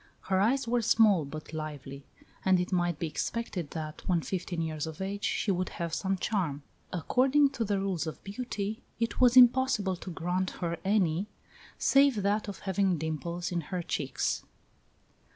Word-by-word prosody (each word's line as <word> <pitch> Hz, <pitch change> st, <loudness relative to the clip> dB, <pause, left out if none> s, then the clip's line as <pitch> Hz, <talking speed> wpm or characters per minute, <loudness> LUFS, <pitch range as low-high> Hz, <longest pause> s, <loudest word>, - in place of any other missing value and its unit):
Her 190 Hz, 0 st, 0 dB
eyes 240 Hz, +6 st, +2 dB
were 240 Hz, +1 st, +2 dB
small, 210 Hz, -7 st, +4 dB
but 155 Hz, +2 st, -8 dB
lively; 145 Hz, -3 st, -6 dB, 0.4 s
and 190 Hz, -1 st, +4 dB
it 180 Hz, +2 st, -2 dB
might 175 Hz, -3 st, +1 dB
be 170 Hz, -, -2 dB
expected 180 Hz, 0 st, -3 dB
that, 155 Hz, -2 st, -6 dB
when 175 Hz, -4 st, +2 dB
fifteen 180 Hz, -2 st, -3 dB
years 155 Hz, -1 st, -3 dB
of 160 Hz, -1 st, -8 dB
age, 200 Hz, +1 st, -4 dB
she 205 Hz, -, +1 dB
would 185 Hz, -1 st, -1 dB
have 170 Hz, -2 st, -3 dB
some 190 Hz, +1 st, 0 dB
charm. 170 Hz, -8 st, -1 dB, 0.3 s
According 265 Hz, -, +3 dB
to 240 Hz, -4 st, -2 dB
the 200 Hz, -2 st, 0 dB
rules 190 Hz, -4 st, -1 dB
of 160 Hz, -, -7 dB
beauty, 215 Hz, +1 st, -4 dB, 0.2 s
it 230 Hz, 0 st, -1 dB
was 250 Hz, 0 st, +6 dB
impossible 245 Hz, -6 st, +5 dB
to 185 Hz, -, -8 dB
grant 180 Hz, +2 st, -1 dB
her 170 Hz, -1 st, -2 dB
any, 190 Hz, -2 st, +1 dB, 0.5 s
save 275 Hz, -7 st, +4 dB
that 205 Hz, +2 st, +1 dB
of 200 Hz, -, -7 dB
having 190 Hz, -2 st, +1 dB
dimples 160 Hz, +3 st, -3 dB
in 175 Hz, -1 st, -1 dB
her 175 Hz, +3 st, -4 dB
cheeks." 135 Hz, -5 st, -2 dB
185 Hz, 170 wpm, -30 LUFS, 165-210 Hz, 0.5 s, was